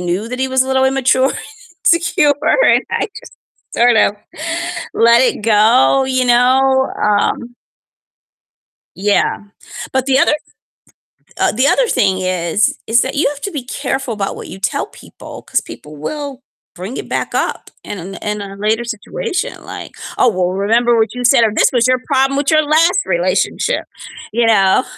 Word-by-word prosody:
knew 180 +5 -2
that 250 - -5
he 265 0 -1
was 260 0 +2
a - - -6
little 265 0 +2
immature 265 0 +2
and - - -5 0.5
insecure 335 -3 +3 0.3
and - - +4
I - - -1
just - - -15 0.4
sort 240 -1 +4
of 205 - +4 0.8
let 235 +1 +5
it 250 - 0
go, 225 +5 +4
you 260 -1 0
know? 265 +2 +3
Um 210 +3 0 1.4
Yeah. 205 +1 +1 0.5
But 265 -1 0
the 270 -1 +3
other - - +3 1.1
uh, - - +2
the 255 +5 +1
other - - +2
thing 190 - +1
is, 185 +2 0
is 230 +2 +3
that 265 - -3
you 290 - +2
have 290 0 -8
to 395 - -4
be 290 -7 -5
careful 265 -1 -3
about 200 -2 -3
what - - -9
you 190 - -10
tell 195 - -1
people - - -13
'cause - - -1
people 150 0 -12
will 275 - -6 0.3
bring 190 +8 -7
it - - -7
back - - -3
up - - -3
in 205 - -6
a 190 +3 -8
in 210 0 -3
a 195 -1 -8
later 215 +3 0
situation 370 - -4
like, - - -8 0.3
"Oh, 250 - +4
well 180 -4 -1
remember 230 +5 +2
what 220 0 0
you 250 - -4
said," 245 -1 +5
or, 220 - +2
"This - - +3
was 240 -1 +3
your 255 0 +2
problem 270 -1 +1
with 285 +1 0
your 310 -1 +5
last 330 +5 +3
relationship." - - 0 0.5
You 235 +1 +1
know? 195 0 +4
245 Hz, 175 wpm, -16 LUFS, 210-270 Hz, 1.4 s, let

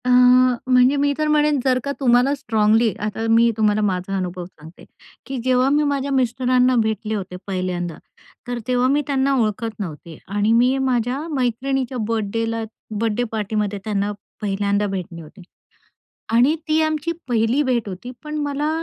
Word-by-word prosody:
अ, - - 0 0.6
म्हणजे 255 +2 +5
मी 285 0 +2
तर 305 0 0
म्हणेन, 300 -1 +3
जर 255 -1 +3
का 280 - -2
तुम्हाला 250 +1 +3
स्ट्राँगली 220 -2 +2 0.2
आता 220 +2 -4
मी 230 +1 +5
तुम्हाला 215 -1 +2
माझा 195 -1 -1
अनुभव 180 -1 -4
सांगते 160 -1 -15 0.4
की 270 0 -5
जेव्हा 255 +1 +3
मी 295 +2 +3
माझ्या 280 0 -2
मिस्टरांना 255 0 +2
भेटले 220 0 -2
होते 190 -3 -5
पहिल्यांदा, 180 -3 -3 0.5
तर 245 -1 -3
तेव्हा 250 0 +2
मी 290 +2 +2
त्यांना 275 -1 +1
ओळखत 220 +1 -2
नव्हते 165 -4 -7 0.2
आणि 205 +2 +2
मी 250 +3 +3
माझ्या 255 -1 0
मैत्रिणीच्या 260 0 -1
बर्थडेला 225 +1 -2 0.4
बर्थडे 230 +1 0
पार्टीमध्ये 210 -1 -2
त्यांना 205 -1 -1 0.3
पहिल्यांदा 200 0 0
भेटले 180 -3 -5
होते 160 +5 -14 0.9
आणि 250 +6 +5
ती 310 +1 +3
आमची 310 +1 -1 0.2
पहिली 235 +4 +2
भेट 245 -5 0
होती. 195 +6 -7
पण 305 0 -5
मला 290 +1 -1
235 Hz, 155 wpm, -21 LUFS, 205-265 Hz, 0.9 s, म्हणजे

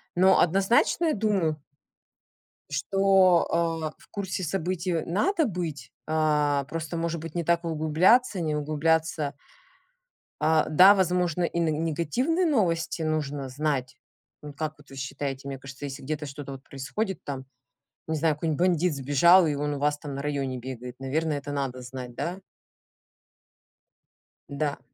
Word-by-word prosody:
Но 185 +2 +5
однозначно 195 - +3
я 315 - +2
думаю 195 -7 +1 1.1
что, 190 +3 +3
а, 165 -2 0
в - - -21
курсе 190 -2 -4
событий, 180 +1 -2
э, 165 -2 -1
надо 320 - +1
быть. 165 - -5
А, 150 -2 +1
просто, 165 +3 -5
может 165 0 -2
быть, 165 -1 -8
не 170 -1 -1
так 170 +1 +1
углубляться, 170 +8 +3
не 155 -2 -1
углубляться 155 0 0 1.1
а, 160 0 +3
да, 185 +6 +8
возможно, 180 -3 +1
и 170 0 -1
на 165 - +2
негативные 165 - 0
новости 175 - 0
нужно 145 -3 -2
знать. 135 -1 -2 0.5
М, 150 -1 -8
как 155 +2 -4
вот 145 - -19
вы 135 - -11
считаете? 135 +1 -4
Мне 135 -1 -5
кажется, 135 +2 -10
если 140 0 -6
где-то 150 +2 -4
что-то 140 0 -7
вот 135 -1 -9
происходит 175 +10 -4
там, 135 -2 -5 0.6
не 160 - -1
знаю, 155 0 +1
какой-нибудь 155 0 -2
бандит 175 -2 +1
сбежал, 150 +7 +5
и 150 - 0
он 145 +1 -2
у - - -5
вас 145 +1 +1
там 145 -1 -7
на 140 - -4
районе 140 -3 -2
бегает, 125 0 -8
наверное, 150 +3 -1
это 145 +1 -7
надо 135 -3 -3
знать, 125 0 -8
да? 175 +7 -3 2.1
Да. 145 0 -2
155 Hz, 150 wpm, -26 LUFS, 140-175 Hz, 2.1 s, да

